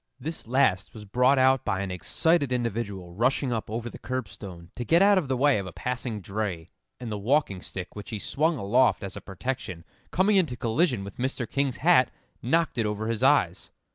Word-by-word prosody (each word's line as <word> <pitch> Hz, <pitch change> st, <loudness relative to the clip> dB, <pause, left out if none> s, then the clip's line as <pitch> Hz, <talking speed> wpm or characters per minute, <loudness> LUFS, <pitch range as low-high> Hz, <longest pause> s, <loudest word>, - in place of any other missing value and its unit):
This 155 Hz, -1 st, -6 dB
last 120 Hz, -8 st, +1 dB
was 105 Hz, -1 st, -9 dB
brought 125 Hz, +6 st, +3 dB
out 130 Hz, 0 st, +4 dB
by 95 Hz, -, -1 dB
an 100 Hz, -1 st, -3 dB
excited 140 Hz, -, +1 dB
individual 110 Hz, -7 st, -3 dB
rushing 125 Hz, +5 st, +1 dB
up 110 Hz, -2 st, -3 dB
over 115 Hz, +2 st, -3 dB
the -, -, -9 dB
curbstone 100 Hz, -8 st, -6 dB
to 120 Hz, -, -4 dB
get 165 Hz, +7 st, +4 dB
out 200 Hz, -1 st, +6 dB
of 160 Hz, -, -4 dB
the 130 Hz, -1 st, 0 dB
way 140 Hz, -3 st, +4 dB
of 95 Hz, -, -5 dB
a -, -, -7 dB
passing 120 Hz, +2 st, -4 dB
dray, 95 Hz, -4 st, -4 dB, 0.3 s
and 120 Hz, -3 st, -6 dB
the 105 Hz, -, -3 dB
walking 110 Hz, -4 st, +1 dB
stick 90 Hz, 0 st, -7 dB
which 105 Hz, -1 st, -8 dB
he 110 Hz, -, -3 dB
swung 155 Hz, +9 st, 0 dB
aloft 120 Hz, +3 st, +2 dB
as 95 Hz, -1 st, -6 dB
a -, -, -7 dB
protection, 95 Hz, -4 st, -5 dB, 0.2 s
coming 195 Hz, +3 st, +3 dB
into 155 Hz, -10 st, +1 dB
collision 120 Hz, -, +1 dB
with 100 Hz, 0 st, -9 dB
Mr. 130 Hz, -1 st, -2 dB
King's 140 Hz, -1 st, -1 dB
hat, 160 Hz, -6 st, +4 dB, 0.3 s
knocked 160 Hz, 0 st, +1 dB
it 110 Hz, -, +1 dB
over 105 Hz, +1 st, -3 dB
his 115 Hz, -2 st, -2 dB
eyes. -, -, +2 dB
120 Hz, 200 wpm, -27 LUFS, 100-135 Hz, 0.3 s, out